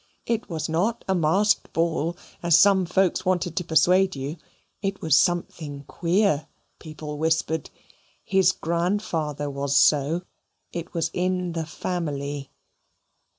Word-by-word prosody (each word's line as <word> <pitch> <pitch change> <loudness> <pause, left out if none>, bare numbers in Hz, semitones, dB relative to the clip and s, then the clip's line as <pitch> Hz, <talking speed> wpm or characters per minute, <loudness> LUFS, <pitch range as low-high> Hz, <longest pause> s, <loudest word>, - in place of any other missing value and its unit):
It 230 -2 -2
was 160 -3 -3
not 185 +9 -1
a 190 - +2
masked 190 +5 +2
ball, 165 0 0 0.2
as 170 -1 +5
some 190 -1 +5
folks 185 +1 +1
wanted 180 -2 0
to 180 - -1
persuade 180 +3 +3
you. 140 +4 -5 0.4
It 195 -1 -2
was 160 -3 +3
something 160 -5 0
queer, 170 0 +1 0.3
people 155 -2 -7
whispered. 160 0 0 0.5
His 190 -2 +3
grandfather 170 -4 -2
was 140 0 0
so. 150 +4 +3 0.5
It 170 0 -6
was 165 -1 0
in 180 0 -1
the 165 -2 -3
family. 145 -5 -4
170 Hz, 125 wpm, -25 LUFS, 155-185 Hz, 0.5 s, as